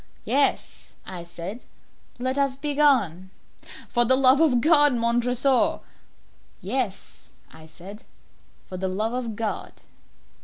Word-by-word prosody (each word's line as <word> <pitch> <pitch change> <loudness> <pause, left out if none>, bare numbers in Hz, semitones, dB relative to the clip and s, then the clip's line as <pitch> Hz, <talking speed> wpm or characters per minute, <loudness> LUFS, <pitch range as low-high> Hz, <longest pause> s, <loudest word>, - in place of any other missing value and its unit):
"Yes," 275 +5 -1
I 180 -2 -8
said, 175 +7 -9 0.5
"let 255 +2 -2
us 275 -2 0
be 290 +2 -4
gone." 210 - +2 0.6
"For 240 - +2
the 255 +2 +5
love 265 +2 +5
of 275 -7 +3
God, 295 0 +4
Montresor!" 240 +3 +1 0.8
"Yes," 215 -1 -5 0.2
I 160 0 -14
said, 190 +7 -12 0.6
"for 185 - -8
the 190 +1 -3
love 210 +5 -3
of 240 -3 -4
God!" 220 -1 -5
240 Hz, 120 wpm, -24 LUFS, 195-270 Hz, 0.8 s, the